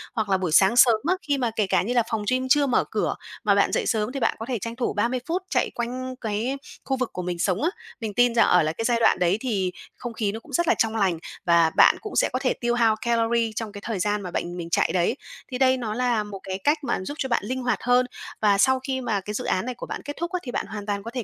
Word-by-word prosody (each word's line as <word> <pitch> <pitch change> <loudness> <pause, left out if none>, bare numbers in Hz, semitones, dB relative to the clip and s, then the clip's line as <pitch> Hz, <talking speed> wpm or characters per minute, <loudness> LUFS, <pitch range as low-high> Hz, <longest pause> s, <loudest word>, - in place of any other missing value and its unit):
Hoặc 220 -3 -1
là 190 - +3
buổi 185 -3 -2
sáng 190 +7 +5
sớm 235 -2 +7
á, 365 - +3
khi 285 -5 0
mà 245 -4 0
kể 210 -3 +1
cả - - +2
như 230 +6 -2
là 240 -2 +3
phòng 225 -2 -1
gym 255 0 0
chưa 285 +3 +5
mở 250 -3 +2
cửa, - - 0 0.3
mà - - +4
bạn - - +3
dậy - - 0
sớm 220 0 0
thì 275 - -4
bạn 230 - +1
có 225 - -4
thể 245 -4 -1
tranh 230 +3 -5
thủ 245 0 -1
30 235 +5 0
phút 355 +3 -1
chạy - - +1
quanh 255 +2 -4
cái 225 +5 -2 0.3
khu 265 - -1
vực 255 -2 -1
của 180 - -4
mình 175 -1 -4
sống 185 +3 0
á. 330 - +3 0.3
Mình 220 -4 -4
tin 245 +1 +3
rằng 230 - +5
ở - - +5
là 155 - 0
cái 225 - -4
giai 235 -1 +2
đoạn 225 - +4
đấy 180 +2 +2
thì 200 -8 -1 0.3
không 240 -1 -6
khí 215 -3 -1
nó 220 - -6
cũng 250 - -16
rất 345 +6 +1
là - - +5
trong 225 0 +1
lành 190 -6 +1 0.3
và 170 -2 +5
bạn - - +7
cũng 425 - -7
sẽ - - +3
có - - 0
thể - - +1
tiêu 240 - -1
hao 230 -2 +3
calorie 230 -1 +1
trong 225 -1 -4
cái 205 0 -9
thời 220 -5 -3
gian 205 +2 0
mà 180 -2 -6
bạn 175 0 -3
mình 170 -1 -6
chạy - - +2
đấy, 180 +6 +1 0.4
thì 250 - -2
đây 260 0 +4
nó 225 -4 -3
là 240 -2 +1
một 205 -2 -8
cái 190 0 -4
cách 295 +2 +3
mà - - -1
giúp 290 - -5
cho 265 - -2
bạn 235 - +1
linh 255 +4 -3
hoạt 250 0 0
hơn. 245 +1 +4 0.4
Và 205 -2 +4
sau 260 +6 +4
khi 260 0 -3
mà 215 -5 -1
cái 210 +2 -6
dự - - -3
án 185 - 0
này 250 0 -4
của - - -7
bạn - - -6
kết 290 - -4
thúc 340 +1 -3
á, 365 - -1
thì 245 - -5
bạn - - -2
hoàn 210 -2 -6
toàn 200 -1 -2
có 230 - -7
thể 250 -1 -3
230 Hz, 300 wpm, -24 LUFS, 205-255 Hz, 0.4 s, sớm